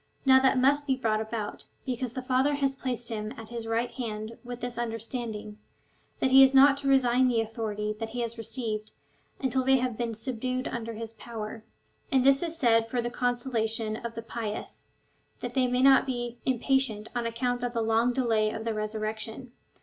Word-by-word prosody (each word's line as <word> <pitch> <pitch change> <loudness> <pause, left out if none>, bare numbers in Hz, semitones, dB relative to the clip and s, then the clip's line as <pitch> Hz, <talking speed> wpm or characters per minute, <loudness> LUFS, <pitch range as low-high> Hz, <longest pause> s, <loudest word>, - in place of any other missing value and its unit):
Now 265 -1 +7
that 265 0 +3
must 285 +3 +3
be 265 - +3
brought 220 -4 0
about, 220 -1 -4 0.2
because 250 -2 -2
the 255 - -4
Father 260 +3 +2
has 275 -1 0
placed 245 -3 -3
him 215 -1 -4
at 225 -1 -9
his 235 -1 -6
right 230 +2 0
hand 220 -2 -5
with 245 0 -7
this 245 -1 -4
under 230 -1 -2
standing, 220 -2 -6 0.6
that 265 - +1
he 270 +1 +9
is 270 0 +6
not 275 +1 +8
to 280 - -4
resign 260 -2 +4
the 240 -2 +2
authority 215 -1 -3
that 225 -1 -3
he 240 +2 -4
has 235 -1 -3
received, 225 -2 -4 0.5
until 260 -1 0
they 265 +1 +5
have 250 -3 -2
been 230 -2 -2
subdued 255 +2 -3
under 230 -1 -4
his 225 0 -7
power. 220 0 -7 0.5
And 265 -2 +4
this 275 +1 +5
is 335 -1 -3
said 230 -5 +3
for 245 - -1
the 240 0 -2
consolation 235 -3 -1
of 230 +1 -6
the 230 - -5
pious, 225 -2 -5 0.5
that 245 0 -5
they 255 -1 +2
may 250 +1 +1
not 270 0 +6
be 240 -2 -3
impatient 255 -4 +1
on 240 -1 0
account 245 +1 -1
of 245 -1 -2
the 230 -2 0
long 225 +2 +3
delay 230 -4 +2
of 220 +1 -5
the 225 - 0
resurrection. 215 +3 -4
240 Hz, 195 wpm, -28 LUFS, 225-255 Hz, 0.6 s, he